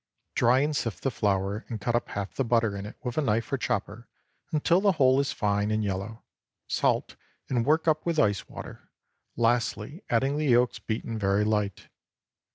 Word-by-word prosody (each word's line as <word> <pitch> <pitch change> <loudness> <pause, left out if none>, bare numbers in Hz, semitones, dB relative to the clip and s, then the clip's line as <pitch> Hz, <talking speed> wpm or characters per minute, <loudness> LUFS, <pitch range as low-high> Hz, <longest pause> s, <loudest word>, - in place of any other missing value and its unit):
Dry 125 +3 +4
and 150 +1 0
sift 115 -6 -3
the 135 - +1
flour 100 0 0
and 115 -3 -4
cut 120 +4 -1
up 120 - 0
half 100 -1 -5
the 135 - 0
butter 115 -3 +1
in 100 +1 -5
it - - -11
with 125 +3 -2
a - - +2
knife 115 -1 0
or - - +2
chopper 110 0 -3 0.4
until 165 +4 +3
the 200 -1 +4
whole 130 -4 +4
is 140 - 0
fine 105 0 0
and 110 0 0
yellow; 100 +3 -4 0.4
salt, - - 0 0.3
and 120 -1 0
work 160 +2 +3
up 155 -1 +2
with 170 -2 -1
ice 105 -9 +1
water, - - -10 0.5
lastly 120 - 0
adding 135 +5 +1
the 155 - 0
yolks 120 -1 +3
beaten 110 0 -4
very 100 0 +2
light. 105 -3 -1
115 Hz, 185 wpm, -27 LUFS, 105-135 Hz, 0.5 s, Dry